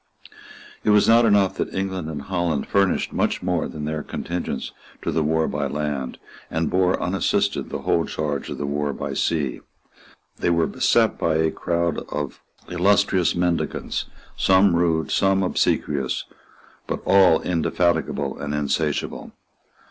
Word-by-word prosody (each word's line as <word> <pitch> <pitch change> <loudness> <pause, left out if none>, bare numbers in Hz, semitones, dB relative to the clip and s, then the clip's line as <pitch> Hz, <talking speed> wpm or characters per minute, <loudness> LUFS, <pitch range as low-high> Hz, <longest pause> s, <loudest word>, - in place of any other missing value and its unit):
It - - +1
was 105 0 +5
not 115 +1 +6
enough 100 -3 +3
that - - -2
England 95 -4 -2
and 75 -3 -5
Holland 85 -3 -1
furnished 100 -2 +1
much - - 0
more 90 -2 0
than 75 -2 -6
their 75 0 -2
contingents 85 +4 -4 0.3
to - - -1
the 80 - +1
war 80 +1 +1
by 70 -1 -2
land, 75 -2 -3 0.3
and 80 -1 -1
bore 90 0 +2
unassisted 95 +3 0
the - - -5
whole 85 - +2
charge 75 -2 -3
of - - -5
the 75 - -3
war 70 0 -1
by - - -4
sea. 75 -6 -1 0.8
They - - +1
were 85 -1 +3
beset - - +2
by 80 -1 +1
a 80 0 +2
crowd 85 -1 -1
of 75 -2 -4 0.3
illustrious 95 0 +2
mendicants, 85 -1 -1 0.3
some 95 -1 +4
rude, 85 -2 +1
some 95 0 +2
obsequious, 70 -6 0 0.6
but - - -3
all 95 -5 +6
indefatigable 85 -4 0
and 75 +1 -3
insatiable. 75 -2 -2
85 Hz, 145 wpm, -23 LUFS, 75-95 Hz, 0.8 s, not